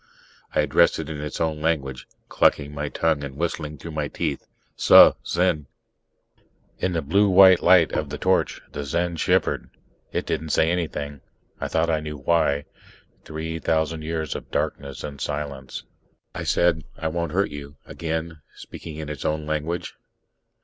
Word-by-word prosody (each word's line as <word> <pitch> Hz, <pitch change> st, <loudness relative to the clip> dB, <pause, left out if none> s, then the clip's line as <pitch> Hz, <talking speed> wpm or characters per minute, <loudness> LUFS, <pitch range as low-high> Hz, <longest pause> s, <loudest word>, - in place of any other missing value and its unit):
I -, -, +4 dB
addressed -, -, +3 dB
it 80 Hz, 0 st, -5 dB
in 75 Hz, -1 st, -5 dB
its 75 Hz, -, -5 dB
own 80 Hz, -2 st, -1 dB
language, 70 Hz, -5 st, -1 dB, 0.2 s
clucking 75 Hz, 0 st, +2 dB
my 75 Hz, 0 st, -3 dB
tongue 80 Hz, -2 st, 0 dB
and 70 Hz, -1 st, -7 dB
whistling 75 Hz, -2 st, -3 dB
through 80 Hz, +5 st, -8 dB
my 75 Hz, -1 st, -2 dB
teeth: 75 Hz, -2 st, -3 dB, 0.3 s
"Suh, -, -, +8 dB
Zen 85 Hz, -4 st, 0 dB, 0.5 s
" -, -, -39 dB
In 90 Hz, -, 0 dB
the 80 Hz, -2 st, -1 dB
blue 100 Hz, +8 st, +3 dB
white 95 Hz, -1 st, +7 dB
light 90 Hz, -2 st, +6 dB
of -, -, -2 dB
the -, -, -5 dB
torch, -, -, +1 dB
the 70 Hz, -, -4 dB
Zen 85 Hz, +4 st, -1 dB
shivered. -, -, +1 dB, 0.4 s
It -, -, -2 dB
didn't 80 Hz, +2 st, -2 dB
say 80 Hz, +2 st, +3 dB
anything. 75 Hz, -5 st, -3 dB, 0.4 s
I -, -, -2 dB
thought 80 Hz, +1 st, +1 dB
I 80 Hz, -, +1 dB
knew 75 Hz, -1 st, -6 dB
why. 75 Hz, -1 st, +1 dB, 0.6 s
Three 80 Hz, +1 st, -5 dB
thousand 80 Hz, 0 st, 0 dB
years 80 Hz, -1 st, -3 dB
of -, -, -8 dB
darkness 70 Hz, -2 st, -3 dB
and 70 Hz, -2 st, -7 dB
silence... 70 Hz, -3 st, -4 dB, 0.5 s
I -, -, -5 dB
said, 85 Hz, -3 st, +2 dB
"I 80 Hz, -, -2 dB
won't 85 Hz, 0 st, -2 dB
hurt 95 Hz, +4 st, +1 dB
you," 70 Hz, 0 st, -8 dB
again 80 Hz, -1 st, -4 dB
speaking 80 Hz, -, -9 dB
in 80 Hz, -1 st, -6 dB
its 75 Hz, -2 st, -6 dB
own 75 Hz, 0 st, -1 dB
language. 80 Hz, +3 st, -3 dB
80 Hz, 165 wpm, -24 LUFS, 75-85 Hz, 0.6 s, Suh